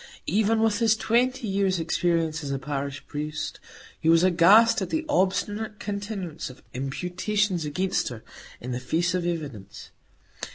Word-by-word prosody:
Even 220 +5 +2
with 220 -1 +2
his 225 -2 +4
twenty 245 +2 +1
years' 195 -2 +1
experience 165 -1 0
as 140 - -4
a 135 - -1
parish 140 0 -4
priest, 150 +1 -4 0.4
he 160 - +1
was 165 +1 +6
aghast 205 +7 +6
at - - -2
the 320 0 -1
obstinate 210 -3 0
continuance 200 -7 -5
of 125 - -14
imputations 180 - -1
against 185 +6 -1
her 115 -3 -9 0.4
in 125 - -6
the 125 - -2
face 165 +8 0
of 180 -1 -1
evidence. 125 - -6
180 Hz, 150 wpm, -26 LUFS, 150-210 Hz, 0.4 s, was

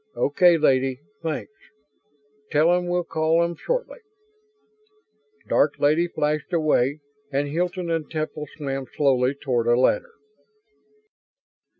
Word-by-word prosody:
"Okay, 170 +4 +4
Lady, 135 -3 +2 0.2
thanks. 160 +4 -4 1.0
Tell 160 +3 +3
'em 180 0 0
we'll 175 0 0
call 165 0 +1
'em 170 0 -2
shortly." - - -3 1.5
Dark - - +2
Lady 155 +4 +2
flashed 150 0 -2
away 150 -3 +1 0.3
and 140 +1 0
Hilton 175 +3 -2
and 165 -3 -2
Temple 155 -1 -4
swam 135 -3 -4
slowly 135 -2 +2
toward 125 -5 -1
a 120 +1 +4
ladder. 485 - +1
155 Hz, 110 wpm, -24 LUFS, 140-170 Hz, 1.5 s, Okay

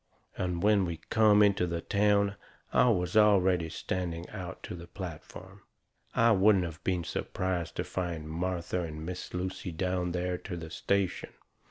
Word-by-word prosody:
And 90 -1 -2
when 105 -2 +4
we 85 -2 -3
come 105 -2 +6
into 100 -3 +3
the 85 -1 -2
town 100 0 +2 0.4
I 125 - +5
was 90 -4 0
already 95 -5 +4
standing 85 0 -3
out 95 -1 -6
onto - - -6
the 85 0 -10
platform. 85 -5 -9 0.5
I 115 0 +5
wouldn't 100 -2 +5
of 85 0 -8
been 90 -2 0
surprised 90 -1 -3
to - - -1
find 85 -4 -4
Martha 90 +2 -2
and 80 -2 -6
Miss 90 +1 -6
Lucy 90 0 -3
down 90 +1 -1
there 90 0 -2
to 90 - -6
the 80 -1 -8
station. 100 +1 -1
90 Hz, 160 wpm, -30 LUFS, 85-100 Hz, 0.5 s, come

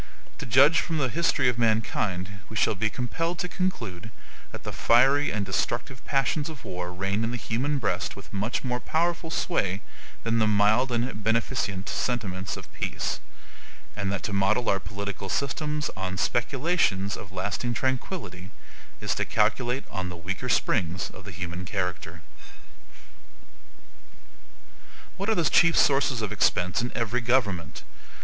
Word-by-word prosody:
To - - -5
judge 140 +7 +6
from 165 - -1
the 135 -4 +1
history 165 -3 +2
of 125 -2 +1
mankind, 105 -4 0
we 110 - -8
shall 110 - +3
be 110 +2 0
compelled 165 - -2
to 180 - -2
conclude 115 - -3 0.4
that - - -8
the - - -4
fiery 135 +5 +4
and 105 -1 -1
destructive 120 +7 -2
passions 140 +3 +1
of 155 -5 -10
war 90 -1 -4
reign 95 +4 -1
in 115 - 0
the 120 - -2
human 125 +7 -1
breast 100 -7 -1
with 100 +1 -12
much 105 +5 -1
more 125 -1 -1
powerful 170 +3 0
sway 100 - 0 0.4
than 115 0 +1
the 110 - +4
mild 105 +5 +4
and 120 -2 -1
beneficent 115 -3 0
sentiments 95 -7 -2
of - - -11
peace; - - -2 0.8
and 100 -2 -1
that 100 - -3
to 105 - -3
model 100 +5 +2
our 100 - +3
political 100 0 -5
systems 150 - -1
upon 95 -1 -4
speculations 120 - +1
of 95 - -9
lasting 100 +6 -2
tranquillity, 125 - -2 0.5
is - - 0
to - - -1
calculate 120 +5 +1
on 95 -1 -3
the 90 - -7
weaker 95 +9 -4
springs 90 -6 +1
of 95 - -12
the 100 - -7
human 90 0 -5
character. 85 -2 -3 2.9
What 195 +3 -2
are 220 - +3
the 170 - +2
chief 170 +1 +5
sources 135 -4 +3
of 105 - -2
expense 90 +2 +2
in 120 - -2
every 120 +1 0
government? 110 -8 0
110 Hz, 155 wpm, -27 LUFS, 95-130 Hz, 2.9 s, judge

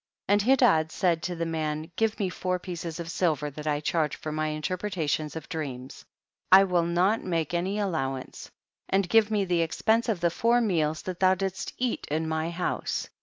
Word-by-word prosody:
36. - - -20 0.2
And 270 -1 +5
Hedad 160 -10 +4
said 170 -2 +1
to 175 - -3
the 165 0 -2
man, 155 0 -3
give 225 0 +1
me 200 - +1
four 185 0 -2
pieces 175 -2 -6
of 165 0 -5
silver 150 -5 0
that 150 +2 -8
I 145 -1 +1
charge 155 -1 0
for 155 - -6
my 155 0 -1
interpretations 155 -1 -2
of 160 -2 -7
dreams; 135 -6 -6 0.5
1 195 +1 +8
will 175 -2 +2
not 185 +6 +2
make 165 -3 -1
any 185 +4 -1
allow 160 -10 -1
ance; 130 - -9 0.4
and 195 -1 +2
give 220 +2 +4
me 210 -2 +1
the 175 -2 +1
expense 220 +8 +1
of 210 -5 0
the 170 0 +1
four 235 +6 +3
meals 160 -9 0
that 185 -2 -5
thou 185 0 +5
didst 190 0 -4
eat 250 -1 -2
in 160 +2 -1
my 160 +1 -1
house. 175 +1 -2
170 Hz, 200 wpm, -27 LUFS, 155-190 Hz, 0.5 s, 1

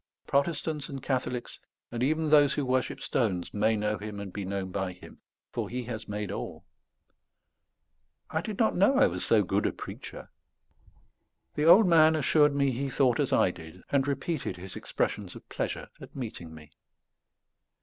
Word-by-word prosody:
Protestants 150 0 -1
and 135 -2 -7
Catholics, 125 -2 -2 0.3
and 120 - -4
even 155 +4 +1
those 145 -2 +6
who 145 - -1
worship 130 0 -1
stones, 95 -8 -1
may 110 +2 +2
know 105 0 -1
Him 105 -1 -6
and 100 -2 -7
be 100 - -4
known 95 0 -3
by 95 -1 -2
Him; 90 - -14 0.3
for - - -3
He 125 +1 -3
has 115 -2 -6
made 105 -1 -4
all." - - -6 1.7
I 160 - 0
did 210 +2 -5
not 225 - +2
know 200 +9 +4
I 275 - +6
was - - -2
so - - +4
good - - 0
a - - 0
preacher. - - -9 1.2
The 150 - 0
old 195 +6 +8
man 160 -2 +6
assured 150 -1 +3
me 140 -1 +2
he 135 +3 -2
thought 125 -2 +2
as - - +1
I - - +4
did, 80 +3 -12
and 140 -1 +2
repeated 145 - -2
his 90 +1 -9
expressions 100 -4 -3
of - - -12
pleasure - - -3
at - - -12
meeting 110 -11 -6
me. 80 -2 -13
125 Hz, 170 wpm, -29 LUFS, 105-150 Hz, 1.7 s, old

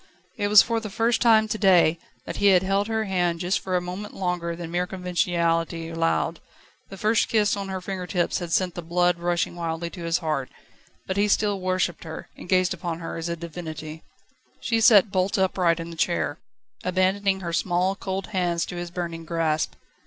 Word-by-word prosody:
It 205 - -1
was 205 -1 +8
for 230 -1 -1
the 220 -1 -6
first 225 +3 +1
time 220 -2 +5
to 215 0 -3
day, 175 -4 +5 0.3
that - - -5
he 205 - +3
had 190 -2 +5
held 195 +2 +1
her 220 -1 0
hand 175 -4 0
just 180 +2 0
for 185 -1 -3
a - - -1
moment 180 +4 -6
longer 180 -2 -2
than 170 -1 -7
mere 180 +1 0
conventionality 170 -2 -1
allowed. 165 0 0 0.5
The 195 - -9
first 215 +3 +2
kiss 210 -2 +2
on 200 -1 -5
her 190 -1 -4
finger 185 -1 -5
tips 175 -2 0
had 175 -2 -6
sent 180 0 +1
the 175 - -5
blood 175 +1 +1
rushing 175 0 0
wildly 170 0 -3
to 175 - -8
his 165 0 +1
heart; 155 -6 -2 0.6
but 190 - -3
he 205 +1 +3
still 205 -1 +1
worshipped 185 -2 -1
her, 160 -1 -8
and - - -12
gazed 185 0 +3
upon 170 -2 -4
her 165 -1 -6
as 165 +1 -4
upon 170 - -3
a - - -20
divinity. 160 -2 -7 0.6
She 230 -2 0
sat 215 -4 +6
bolt 185 +1 +1
upright 180 -3 +2
in 165 0 -6
the - - -8
chair, 165 -2 -1 0.4
abandoning 190 +1 +1
her 170 -2 -4
small, 180 +3 +1
cold 190 -1 -4
hands 175 -4 0
to 175 - -7
his 175 0 -4
burning 170 -2 -5
grasp. 160 -1 -1
180 Hz, 205 wpm, -25 LUFS, 170-195 Hz, 0.6 s, was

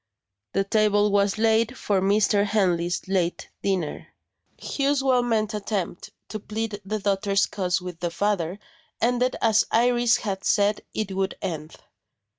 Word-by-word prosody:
The 195 - +2
table 205 0 +2
was 200 +1 +2
laid 225 +2 +2
for 195 -2 0
Mr. 200 +1 +3
Henley's 180 -5 0
late 180 -3 -1
dinner. 185 -6 -2 0.5
Hugh's 280 -1 0
well 255 -2 +3
meant 220 -3 0
attempt 200 -4 -3 0.2
to 215 - -5
plead 215 0 -4
the 210 +3 -2
daughter's 200 0 +1
cause 180 -2 -1
with 180 -2 -8
the 175 - -1
father 180 0 -1 0.4
ended 245 +2 +1
as 220 -1 +4
Iris 240 0 +3
had 195 -3 -4
said 205 0 +2
it 215 -2 -2
would 190 0 -1
end. 160 -5 -5
205 Hz, 140 wpm, -25 LUFS, 190-220 Hz, 0.5 s, as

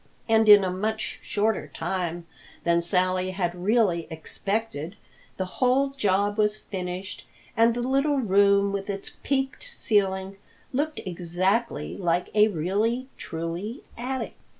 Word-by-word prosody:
And 220 -1 +4
in 205 -1 +10
a 185 - 0
much 215 +4 -3
shorter 210 -6 0
time 170 +2 -3 0.4
than 170 0 +3
Sally 185 +1 +1
had 185 -2 -1
really 180 -2 +1
expected, 180 +1 -3 0.4
the 190 - -1 0.2
whole 260 +2 +4
job 205 -4 +1
was 210 0 +2
finished 185 -1 -6 0.3
and 230 +1 +4
the 240 - -1
little 275 +3 +2
room 200 -3 +4
with 200 0 -3
its 195 -1 -5
peaked 270 0 -1
ceiling 195 - 0 0.4
looked 300 +4 -1
exactly 185 +5 -1
like 175 -1 0
a 210 0 +6
really 215 - -1
truly 170 +8 -5
attic. 255 +2 -4
200 Hz, 125 wpm, -26 LUFS, 180-225 Hz, 0.4 s, in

